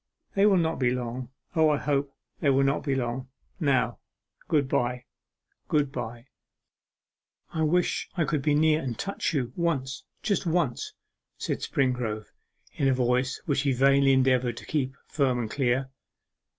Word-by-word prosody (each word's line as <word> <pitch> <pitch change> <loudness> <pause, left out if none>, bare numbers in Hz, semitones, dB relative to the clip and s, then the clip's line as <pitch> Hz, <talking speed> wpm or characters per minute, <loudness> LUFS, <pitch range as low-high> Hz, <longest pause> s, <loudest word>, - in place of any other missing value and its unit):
They 200 +1 +4
will 195 -2 +5
not 165 -1 0
be 125 -2 +3
long. 125 0 -3 0.3
O, 160 -1 +5
I 150 - +3
hope 140 -1 0 0.3
they 150 - +2
will 135 0 +4
not 135 +1 +1
be 140 -3 0
long!... 125 0 -2 0.3
Now, 130 -6 +1 0.5
good 145 -4 +2
bye, 125 -1 0 0.6
good 145 -3 +1
bye!' 120 -1 -6 1.3
'I 160 - -1
wish 175 +3 +1
I 165 - +2
could 150 -3 0
be 145 +1 +2
near 155 +1 +4
and 125 -4 -4
touch 200 0 -2
you 125 -3 -1
once, 140 -6 -1 0.2
just 200 -3 0
once,' 160 -7 0 0.4
said - - -2
Springrove, 125 -5 -1 0.4
in 135 - +1
a 135 - +3
voice 125 +1 0
which 140 -5 +1
he 140 -1 +1
vainly 135 +2 +4
endeavoured 130 -2 +2
to - - -8
keep 135 -3 -1
firm 135 -4 +1
and 115 -3 -3
clear. 130 0 0
135 Hz, 160 wpm, -27 LUFS, 125-150 Hz, 1.3 s, will